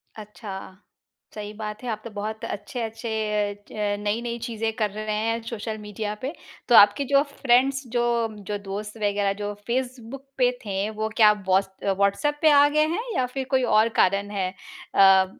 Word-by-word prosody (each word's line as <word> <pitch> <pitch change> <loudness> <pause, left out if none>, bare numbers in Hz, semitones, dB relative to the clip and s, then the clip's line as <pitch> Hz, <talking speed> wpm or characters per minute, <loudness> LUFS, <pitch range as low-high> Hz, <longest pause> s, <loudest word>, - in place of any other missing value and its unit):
अच्छा 210 -1 -9 0.8
सही 210 0 -6
बात 215 +1 -6
है। 245 - -4
आप 215 -1 -3
तो - - -5
बहुत 215 +2 -5
अच्छे-अच्छे 225 +1 -5 0.6
च - - -14 0.3
नई-नई 235 +3 -2
चीज़ें 225 -1 -2
कर 210 - +2
रहे 215 0 -2
हैं 230 0 0
सोशल 220 -1 -4
मीडिया 210 0 -4
पे। 275 +5 -3 0.4
तो 240 - +6
आपके 205 +7 +7
जो 275 0 +6
फ्रेंड्स 265 +1 +2
जो 240 - +3 0.5
जो 205 - -1
दोस्त 210 +3 -5
वगैरह 205 -2 +1
जो 205 0 -2
फेसबुक 255 +1 -3
पे 250 -1 +4
थे, 200 +1 -1
वो 220 0 -3
क्या 210 -1 +9
व्हाट्स 190 -1 +1 0.3
व्हाट्सएप 200 +10 +1
पे 315 - +6
आ 290 0 +7
गए 305 - +5
हैं 450 - -2
या 255 - +2
फ़िर 265 +1 -4
कोई 260 -1 +3
और 225 +1 +5
कारण 200 +2 +1
है 185 -1 0 0.5
अ, 195 -1 +7
220 Hz, 170 wpm, -25 LUFS, 205-245 Hz, 0.8 s, क्या